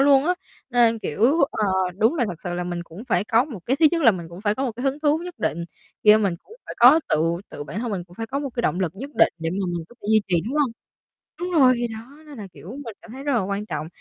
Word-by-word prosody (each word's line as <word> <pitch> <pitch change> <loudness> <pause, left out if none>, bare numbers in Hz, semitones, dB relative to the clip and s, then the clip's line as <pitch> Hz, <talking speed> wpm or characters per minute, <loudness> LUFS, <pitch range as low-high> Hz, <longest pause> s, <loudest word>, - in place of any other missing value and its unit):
luôn 275 0 +5
á. 360 +3 +2 0.4
Nên, 235 -2 +4
kiểu, 225 - +1
ờ, 215 - -1 0.3
đúng 225 +9 +3
là 265 - +1
thật 170 -3 -7
sự 175 -1 -3
là 180 0 -2
mình 175 -1 -4
cũng 170 +6 -11
phải 180 +3 +2
có 225 +3 +3
một 265 -9 -8
cái 260 - +1
thứ 320 - +8
nhất 335 -1 0
là 230 - +8
mình 175 -5 -5
cũng 170 +2 -10
phải 205 0 +1
có 265 +4 -2
một 245 - -2
cái 240 +3 -7
hứng 275 +2 0
thú 300 0 +3
nhất 350 0 -7
định 170 +2 -1 0.4
khi 210 0 +8
mình 200 -5 +1
cũng - - -18
phải - - -6
có 260 +7 +8
tự - - +3 0.3
tự 145 - -7
bản 165 +9 -5
thân 240 -1 -3
mình 185 -4 -3
cũng 175 0 -18
phải 225 - -4
có 270 +4 -3
một 280 -1 -4
cái 240 - -1
động 180 - 0
lực 170 -4 0
nhất 265 +8 -7
định - - +4
để 165 0 -2
mà 195 +3 -2
mình 175 -2 -3
có - - -17
thể - - -8
duy 215 - +6
trì, 180 - +2
đúng 245 +6 -4
hông? 285 -5 +2 0.7
Đúng 355 +1 -2
rồi, 255 -1 +7
thì 240 0 -1
đó, 220 -1 -7 0.3
nên 290 -4 -11
là, 205 - -6
kiểu, 185 - -12
mình 225 - -7
cảm 225 - -12
thấy 265 +2 -8
rất 285 0 -1
là 240 - +3
quan 200 +2 -3
trọng, 155 -5 -4
225 Hz, 305 wpm, -23 LUFS, 180-270 Hz, 0.7 s, thứ